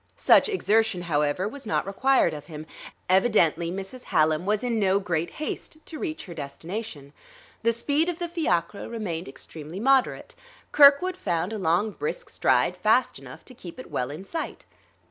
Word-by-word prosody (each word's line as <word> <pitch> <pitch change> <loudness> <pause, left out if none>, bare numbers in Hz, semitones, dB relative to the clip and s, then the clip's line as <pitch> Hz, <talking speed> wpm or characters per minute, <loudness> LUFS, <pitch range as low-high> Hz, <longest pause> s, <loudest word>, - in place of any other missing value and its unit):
Such - - +5
exertion, 220 - +1
however, 150 +3 0
was 260 +1 -8
not - - 0
required 200 -2 +2
of 150 -1 -8
him. 155 -2 -8 0.4
Evidently 185 -4 +3
Mrs. 195 +8 -7
Hallam 155 +3 +1
was 210 +2 +1
in 235 -2 0
no 195 -1 +3
great 170 -3 -2
haste 310 0 -5
to 315 - -8
reach 315 -3 -4
her 175 - -9
destination; 155 +1 -7 0.5
the 230 - +3
speed 285 +8 0
of 345 - -3
the 345 -1 -3
fiacre 210 - -1
remained 195 -8 -4
extremely 155 +5 -9
moderate; 265 +3 +2 0.4
Kirkwood 295 +6 +6
found 175 +2 -2
a 215 - -4
long, 185 +5 +1
brisk 475 - -5
stride - - +2
fast - - +2
enough - - -12
to 255 - -12
keep 215 -3 -11
it - - -10
well 125 - -2
in 155 +7 -8
sight. 325 +8 -5
200 Hz, 165 wpm, -26 LUFS, 170-265 Hz, 0.5 s, Kirkwood